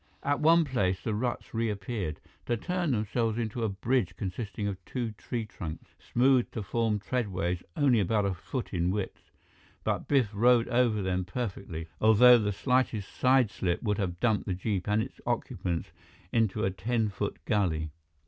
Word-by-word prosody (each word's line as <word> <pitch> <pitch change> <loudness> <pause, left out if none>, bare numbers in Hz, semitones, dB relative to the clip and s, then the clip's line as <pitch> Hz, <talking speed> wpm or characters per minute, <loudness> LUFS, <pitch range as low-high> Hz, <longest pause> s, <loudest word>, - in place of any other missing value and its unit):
At 145 +1 +1
one 165 +2 +5
place, 95 -9 0
the 110 - -2
ruts 120 +3 -3
reappeared, 105 -6 -2 0.3
to 120 - +1
turn 180 +5 -1
themselves 115 -1 0
into 115 0 -2
a 110 - +1
bridge 110 +1 0
consisting 100 +2 -4
of 95 -2 -5
two 120 +1 -3
tree 115 +2 -4
trunks, 85 -6 -8
smoothed 125 0 +2
to 110 - -3
form 110 +1 0
treadways 95 -6 -2 0.2
only 135 -5 +4
about 105 +1 +1
a 100 - +1
foot 120 +8 -5
in 90 -1 +1
width. 100 0 -4 0.5
But - - -1
Biff 130 -8 +3
rode 120 +2 +4
over 120 -4 +2
them 95 0 0
perfectly, 90 -5 -5
although 120 +3 +7
the 105 -2 0
slightest 115 -1 0
sideslip 120 -8 +2
would 105 -2 0
have 90 -3 -2
dumped 110 -4 +1
the 95 - 0
jeep 95 0 -2
and 105 +1 +2
its - - -10
occupants 85 -2 -2 0.4
into 115 -4 +1
a 95 - +1
ten 110 +4 0
foot 95 - -3
gully. 80 -7 0
110 Hz, 165 wpm, -29 LUFS, 95-120 Hz, 0.5 s, although